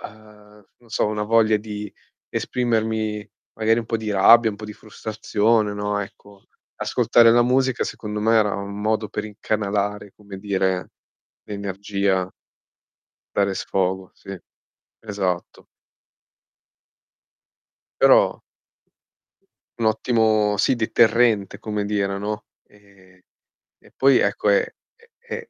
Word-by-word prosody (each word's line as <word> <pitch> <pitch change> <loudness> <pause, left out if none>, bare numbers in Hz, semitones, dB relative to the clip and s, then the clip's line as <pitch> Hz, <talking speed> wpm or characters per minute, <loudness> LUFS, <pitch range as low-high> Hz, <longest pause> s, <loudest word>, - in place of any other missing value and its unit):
uhm, 105 -1 -14
non 120 - -24
so 110 - 0
una 105 0 -2
voglia 110 -1 +3
di 105 -1 -7 0.4
esprimermi 110 -3 -2 0.3
magari 115 +1 +2
un 115 - -8
po' 115 - -1
di 110 -1 -4
rabbia, 110 +4 +6
un 100 - -9
po' 105 - -9
di 105 - -7
frustrazione, 110 0 -1
no, 105 0 -2
ecco 100 0 -10 0.3
ascoltare 115 -1 +4
la 120 0 +5
musica 130 0 +1
secondo 105 -1 -5
me 115 +1 +3
era 105 -2 +2
un 100 +1 -6
modo 110 0 0
per 105 +1 -4
incanalare, 105 -1 -3
come 100 -2 -11
dire, 95 -2 -1 0.5
l'energia 100 -2 -2 1.0
Dare 100 -1 +1
sfogo, 95 0 -2
sì, 95 - -16 0.7
esatto. 95 -5 -4 2.3
Però - - +4 1.4
Un 115 -1 +1
ottimo 110 -2 +2
sì, 100 +5 +2
deterrente 115 -2 +2
come 105 -1 -3
dire, 100 -1 -1
no. 105 +1 -4 0.2
Ehm, 100 -2 -22 0.6
e - - -22
poi 135 -1 +4
ecco - - 0
è - - +4 0.5
è 470 0 -8
105 Hz, 115 wpm, -22 LUFS, 100-110 Hz, 2.3 s, rabbia